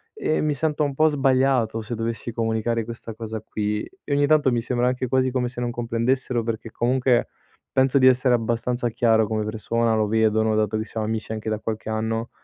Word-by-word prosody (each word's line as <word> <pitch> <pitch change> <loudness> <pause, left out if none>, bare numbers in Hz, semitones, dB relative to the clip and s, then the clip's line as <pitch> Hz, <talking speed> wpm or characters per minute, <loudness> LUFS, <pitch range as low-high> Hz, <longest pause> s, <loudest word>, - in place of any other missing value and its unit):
E 155 - 0
mi 150 -1 +1
sento 150 +1 0
un 140 -1 -1
po' 155 +2 +4
sbagliato 130 -5 +2
se 120 - -6
dovessi 115 +1 -3
comunicare 115 0 -1
questa 115 -1 -7
cosa 110 -1 -5
qui, 105 -1 -2 0.2
e - - -3
ogni 145 - +3
tanto 150 -4 +4
mi 120 -1 +1
sembra 125 0 0
anche 125 0 -1
quasi 130 +1 +2
come 125 -1 0
se 120 0 -6
non 120 - -1
comprendessero, 120 +1 -1
perché 115 -1 -4
comunque 125 0 +1 0.4
penso 135 +1 +3
di 130 - +6
essere 125 0 +4
abbastanza 120 +1 -1
chiaro 110 -1 +3
come 110 -1 -1
persona, 115 +1 0
lo 110 -1 +2
vedono 110 0 +2
dato 110 -1 0
che 110 - -3
siamo 110 -1 -4
amici 110 0 -3
anche 110 0 -4
da 110 - -1
qualche 110 0 -4
anno. 110 +1 -2
115 Hz, 205 wpm, -23 LUFS, 110-130 Hz, 0.4 s, di